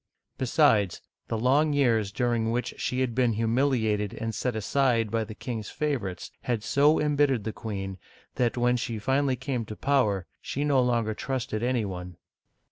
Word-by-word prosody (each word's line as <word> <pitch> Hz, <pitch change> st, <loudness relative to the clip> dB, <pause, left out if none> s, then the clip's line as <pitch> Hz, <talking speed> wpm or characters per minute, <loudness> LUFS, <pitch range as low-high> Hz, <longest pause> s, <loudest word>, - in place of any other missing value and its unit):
Besides, 120 Hz, -, +3 dB, 0.3 s
the 115 Hz, -, -2 dB
long 140 Hz, +6 st, +3 dB
years 115 Hz, -8 st, +2 dB
during 120 Hz, -1 st, 0 dB
which 120 Hz, +2 st, -1 dB
she 125 Hz, +1 st, -1 dB
had 125 Hz, -3 st, 0 dB
been 125 Hz, -1 st, +2 dB
humiliated 110 Hz, -3 st, +1 dB
and 115 Hz, 0 st, -3 dB
set 125 Hz, 0 st, -2 dB
aside 115 Hz, -1 st, +1 dB
by 115 Hz, 0 st, +1 dB
the 110 Hz, 0 st, -8 dB
king's 115 Hz, -4 st, -5 dB
favorites 120 Hz, -, -3 dB
had 120 Hz, -4 st, -2 dB
so 145 Hz, +6 st, +4 dB
embittered 145 Hz, -6 st, +2 dB
the 110 Hz, +1 st, -3 dB
queen 95 Hz, -4 st, -5 dB, 0.3 s
that, 120 Hz, -1 st, 0 dB
when 125 Hz, 0 st, +3 dB
she 115 Hz, -1 st, -3 dB
finally 135 Hz, +4 st, +1 dB
came 130 Hz, -1 st, -3 dB
to 110 Hz, -, -7 dB
power, 105 Hz, -9 st, +1 dB, 0.2 s
she 140 Hz, -, -3 dB
no 140 Hz, -3 st, +3 dB
longer 115 Hz, -3 st, +1 dB
trusted 120 Hz, -2 st, -3 dB
any 120 Hz, -2 st, +1 dB
one. 90 Hz, -2 st, -6 dB
120 Hz, 165 wpm, -27 LUFS, 110-130 Hz, 0.3 s, so